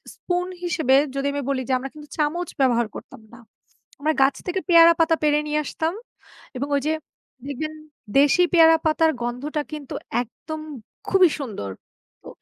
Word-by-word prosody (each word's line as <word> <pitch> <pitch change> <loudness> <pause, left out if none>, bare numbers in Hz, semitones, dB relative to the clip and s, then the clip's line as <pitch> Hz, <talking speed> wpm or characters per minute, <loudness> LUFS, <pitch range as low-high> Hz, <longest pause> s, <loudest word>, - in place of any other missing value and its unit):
Spoon 355 0 -2 0.2
হিসেবে 320 -7 +2 0.2
যদি 275 +1 -1
আমি 285 - -2
বলি 265 -2 0
যে, 260 - +2
আমরা 270 +2 -6
কিন্তু 300 -1 -12
চামচ 315 +4 -1
ব্যবহার 240 -3 +3
করতাম - - -10
না। 245 - -13 0.6
আমরা 310 +2 +1
গাছ 270 +1 +4
থেকে 365 +1 -1
পেয়ারা 335 -1 +8
পাতা 325 0 +4
পেড়ে 295 0 +3
নিয়ে 300 0 0
আসতাম। 325 +2 -2 0.6
এবং 280 +3 -3
ওই - - +1
যে 315 - +2 0.5
দেখবেন, 310 +3 -4 0.5
দেশি 290 +5 +5
পেয়ারা 325 -1 +7
পাতার 320 +1 +3
গন্ধটা 270 +6 -3
কিন্তু 295 -3 -7 0.3
একদম 310 +6 -8 0.5
খুবই 375 -3 +5
সুন্দর। 200 - -5 0.5
তো - - -10
300 Hz, 160 wpm, -23 LUFS, 270-325 Hz, 0.6 s, পেয়ারা